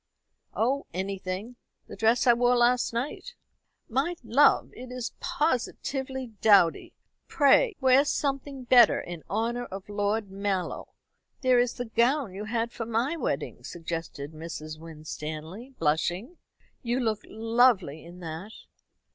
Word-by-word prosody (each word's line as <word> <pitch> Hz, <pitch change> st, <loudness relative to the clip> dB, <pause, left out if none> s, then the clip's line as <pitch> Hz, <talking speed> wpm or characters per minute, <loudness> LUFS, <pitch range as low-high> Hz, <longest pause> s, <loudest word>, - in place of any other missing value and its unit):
oh, 265 Hz, +5 st, 0 dB
anything. 190 Hz, +4 st, -4 dB, 0.3 s
The -, -, -10 dB
dress 225 Hz, +3 st, +3 dB
I 240 Hz, -, +7 dB
wore 245 Hz, +1 st, +3 dB
last 240 Hz, +1 st, +3 dB
night." 275 Hz, -, -4 dB, 0.5 s
"My 275 Hz, +9 st, 0 dB
love, 240 Hz, +6 st, +4 dB
it 250 Hz, 0 st, -10 dB
is 250 Hz, -1 st, -5 dB
positively 265 Hz, -5 st, -2 dB
dowdy. 200 Hz, -6 st, +4 dB, 0.3 s
Pray 390 Hz, -, +4 dB
wear 265 Hz, 0 st, +5 dB
something 275 Hz, -2 st, -2 dB
better 245 Hz, -2 st, +6 dB
in 175 Hz, -2 st, -7 dB
honour 235 Hz, +4 st, -1 dB
of 195 Hz, -2 st, -8 dB
Lord 205 Hz, 0 st, -1 dB
Mallow. 195 Hz, -2 st, -2 dB, 0.5 s
There 255 Hz, -2 st, +4 dB
is 245 Hz, 0 st, +1 dB
the 245 Hz, -, -4 dB
gown 235 Hz, 0 st, +1 dB
you 205 Hz, +3 st, -6 dB
had 230 Hz, +1 st, -1 dB
for 230 Hz, -2 st, -5 dB
my 235 Hz, +7 st, 0 dB
wedding," 330 Hz, -, -3 dB
suggested 165 Hz, -4 st, -6 dB
Mrs. 155 Hz, -1 st, -7 dB
Winstanley, 160 Hz, -, -8 dB
blushing. 175 Hz, -, -1 dB, 0.4 s
"You 245 Hz, 0 st, -1 dB
look 220 Hz, -4 st, 0 dB
lovely 225 Hz, -, +2 dB
in 175 Hz, +2 st, -12 dB
that." 170 Hz, +6 st, -7 dB
230 Hz, 130 wpm, -27 LUFS, 185-255 Hz, 0.5 s, I